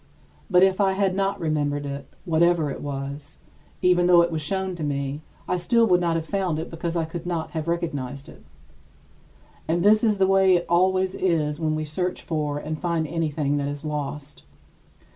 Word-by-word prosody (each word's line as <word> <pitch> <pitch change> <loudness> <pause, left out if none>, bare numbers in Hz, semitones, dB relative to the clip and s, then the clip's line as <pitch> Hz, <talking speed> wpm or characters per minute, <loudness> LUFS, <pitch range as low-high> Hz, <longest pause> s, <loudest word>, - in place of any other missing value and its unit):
But 180 -1 +5
if 190 +1 +3
I 195 -1 +3
had 190 -1 +1
not 195 0 0
remembered 145 -2 -1
it 140 -1 -6
whatever 165 -2 +2
it - - -6
was 140 +1 -6 0.5
even 180 -1 +4
though 175 -1 +7
it 170 - -1
was 160 -1 -2
shown 190 +4 -2
to 160 - -5
me, 140 0 -2 0.3
I 180 - 0
still 230 +6 +3
would 180 -4 +3
not 170 -1 +1
have 165 -1 -2
found 185 -4 -1
it 160 - -5
because 165 +1 -4
I 165 -1 0
could 170 +2 -7
not 170 -2 -3
have 160 -1 -4
recognized 145 -5 -3
it. 75 - -14 1.2
And 170 +2 +1
this 215 +2 +5
is 215 -3 +3
the 190 - +4
way 190 -1 +4
it 175 - 0
always 185 +2 +2
is 155 -5 0
when 155 -1 0
we 155 0 -2
search 180 +4 -3
for 150 -3 -2
and 155 +1 -5
find 170 -2 0
anything 150 -2 -1
that 140 -1 -1
is 145 +1 -6
lost. 145 -1 -5
165 Hz, 195 wpm, -24 LUFS, 150-180 Hz, 1.2 s, though